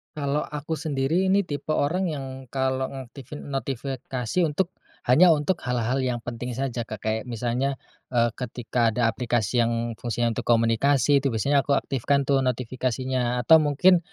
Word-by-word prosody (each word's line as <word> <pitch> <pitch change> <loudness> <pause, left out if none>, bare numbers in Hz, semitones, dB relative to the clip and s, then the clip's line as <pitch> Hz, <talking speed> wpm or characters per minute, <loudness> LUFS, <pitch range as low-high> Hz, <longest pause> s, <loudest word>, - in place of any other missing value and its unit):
Kalau 145 0 -1
aku 150 +2 -4
sendiri 155 +5 0
ini 195 +1 +3
tipe 150 -2 -4
orang 180 +6 +1
yang, 145 -5 -4 0.2
kalau 130 0 -1
ngaktifin 135 +2 -9
notifikasi 135 0 -3
untuk, 175 +5 -1 0.4
hanya 165 +8 +7
untuk 160 +4 +1
hal-hal 125 +1 0
yang 125 -2 -1
penting 120 +1 -5
saja 125 -1 -2
Kak, 110 -3 -7
kayak 110 0 -1
misalnya, 125 +3 -1 0.4
eee, 120 -1 +3
ketika 120 -1 -1
ada 115 +1 +1
aplikasi 120 -1 0
yang 115 0 -1
fungsinya 120 0 -1
untuk - - -3
komunikasi 120 +5 +3
itu 135 - +1
biasanya 140 +5 +2
aku - - -2
aktifkan 140 +2 0
tuh 140 -1 +3
notifikasinya, 125 0 -1
atau 160 - +8
mungkin, 170 +5 +4
130 Hz, 155 wpm, -25 LUFS, 120-145 Hz, 0.4 s, atau